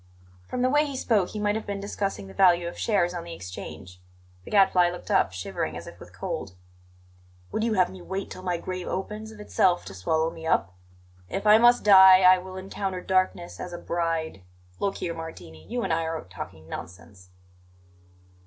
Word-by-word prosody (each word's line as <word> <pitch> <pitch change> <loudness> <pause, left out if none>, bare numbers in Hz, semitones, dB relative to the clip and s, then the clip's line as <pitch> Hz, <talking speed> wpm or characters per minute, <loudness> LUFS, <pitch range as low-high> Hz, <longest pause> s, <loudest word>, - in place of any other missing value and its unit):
From 250 - -2
the 255 - +3
way 295 +1 +4
he 280 - -5
spoke 210 -8 +1
he 215 - -6
might 205 0 +1
have 220 +1 -4
been 200 -1 -3
discussing 200 - -3
the 95 - -11
value 175 - +4
of 170 - -6
shares 185 -5 +1
on 175 -1 -5
the 170 0 -8
Exchange. 90 - -9 0.4
The - - -9
Gadfly 190 -3 +4
looked 175 0 -7
up, - - +3
shivering 90 -3 -4
as 85 - -8
if - - -12
with - - -13
cold. 90 - -5 1.0
"Would 220 - -1
you 225 -2 +1
have 185 -2 +3
me 190 -1 -11
wait 190 +2 -5
till - - -8
my 180 -2 -1
grave 185 +1 -5
opens 210 +3 -4
of 215 - -13
itself 185 -3 +1
to - - -8
swallow 160 - 0
me 160 -1 -8
up? 95 - +1 0.6
"If 195 - -4
I 210 +1 +7
must 240 +1 +5
die, 190 -2 +9
I 185 0 +7
will 185 +1 -9
encounter 190 0 -4
darkness 185 -2 0
as 180 - -6
a - - -4
bride 165 - -2 0.4
Look 200 -1 -1
here, 170 - -3
Martini, 90 - -10
you 240 0 -2
and - - 0
I 165 - +1
are 160 0 -3
talking 80 -3 -10
nonsense." 90 +2 -10
180 Hz, 200 wpm, -26 LUFS, 160-200 Hz, 1.0 s, die